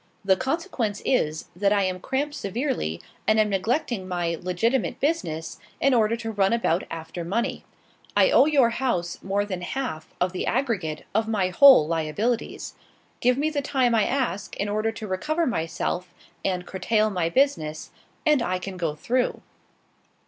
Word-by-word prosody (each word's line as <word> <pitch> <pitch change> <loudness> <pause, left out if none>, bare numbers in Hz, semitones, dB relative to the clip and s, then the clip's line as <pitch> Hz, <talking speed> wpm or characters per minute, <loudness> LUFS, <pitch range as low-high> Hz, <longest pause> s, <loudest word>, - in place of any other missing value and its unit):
The 190 -1 +5
consequence 260 - -2
is, 155 - +1
that 200 +2 +2
I 205 -1 +3
am 185 -1 -1
cramped 275 +7 -2
severely, 195 - -2 0.3
and 215 0 +4
am 215 -1 +3
neglecting 210 0 -1
my 175 -2 -1
legitimate 185 +9 0
business 275 - -2 0.2
in 275 - +3
order 230 -1 +3
to 225 -1 -4
run 200 -1 +2
about 190 -7 +1
after 165 +1 -6
money. 205 +8 -2 0.5
I - - +5
owe 280 - +6
your 275 -6 +4
house 230 -9 -1
more 200 +1 0
than 185 -3 -4
half 175 -6 -4
of 180 0 +1
the 185 - -3
aggregate 205 - -1
of 220 +2 +1
my 200 -5 +1
whole 265 - +8
liabilities. 165 +9 -2 0.5
Give 250 +1 +3
me 305 +3 +1
the 290 -2 -1
time 260 -3 +1
I 220 -2 +3
ask, 250 -7 -2
in 205 - -1
order 215 +2 0
to 220 -1 -7
recover 310 - 0
myself 175 - -2 0.3
and 180 -2 -1
curtail 215 +4 +1
my 175 -4 0
business, 170 - 0 0.3
and 300 -4 +4
I 185 -5 0
can 185 0 -7
go 165 -4 -2
through." 245 +11 -1
210 Hz, 165 wpm, -25 LUFS, 180-250 Hz, 0.5 s, whole